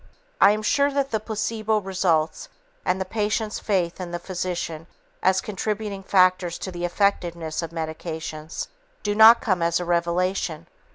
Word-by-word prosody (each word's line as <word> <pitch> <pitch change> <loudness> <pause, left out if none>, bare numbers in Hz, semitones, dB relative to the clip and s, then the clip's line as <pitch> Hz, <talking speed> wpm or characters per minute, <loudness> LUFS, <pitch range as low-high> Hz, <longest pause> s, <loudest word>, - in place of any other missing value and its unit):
I - - +9
am 215 +1 +1
sure 280 +5 +3
that 275 -1 -1
the 220 - +1
placebo 215 0 -1
results 185 -5 0 0.4
and 185 - +1
the 190 - -2
patient's 215 +1 -1
faith 185 -3 -1
in 180 - -5
the 175 - -3
physician 175 -3 -4 0.3
as 190 0 +3
contributing 210 0 -3
factors 185 -2 +3
to 190 - -5
the 175 0 -3
effectiveness 175 -4 0
of 165 - -4
medications 160 -1 -5 0.4
do 205 - 0
not 220 +2 +8
come 185 -6 0
as 170 +1 +2
a 175 - -3
revelation. 170 -1 0
185 Hz, 155 wpm, -24 LUFS, 170-210 Hz, 0.4 s, I